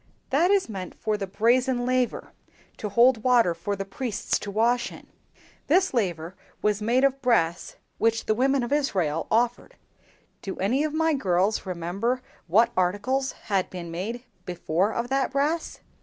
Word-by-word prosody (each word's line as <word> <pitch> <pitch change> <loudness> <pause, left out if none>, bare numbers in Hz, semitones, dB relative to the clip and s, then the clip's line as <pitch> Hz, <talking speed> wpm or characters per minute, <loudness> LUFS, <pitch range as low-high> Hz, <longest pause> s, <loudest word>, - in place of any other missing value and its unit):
"That 320 +7 +3
is 400 -1 +3
meant 190 -5 -7
for 215 - -1
the 200 -2 -4
Brazen 245 +5 +2
Laver, 255 -1 -1 0.4
to 210 - -4
hold 235 +2 +4
water 240 -8 +4
for 185 +5 -3
the 195 0 -5
priests 225 +2 -2
to 205 - -6
wash 235 +4 +1
in. - - -12 0.6
This 370 +3 +3
laver 180 -7 -1 0.3
was 210 0 +1
made 240 +5 +2
of 275 0 +2
brass 175 -10 +1 0.2
which 230 0 +1
the 215 - +2
women 265 +3 +2
of 240 - -2
Israel 185 - 0
offered. 240 +2 0 0.7
Do 195 - -5
any 245 +10 +1
of 310 - -1
my 320 0 +2
girls 195 -5 0
remember 190 +9 -2 0.2
what 215 +8 +4
articles 205 +9 0
had 195 -2 0
been 175 -2 -7
made 220 +8 -4 0.2
before 180 +2 -1
of 235 +2 -3
that 270 -1 +1
brass?" 295 +4 -1
230 Hz, 160 wpm, -25 LUFS, 190-255 Hz, 0.7 s, hold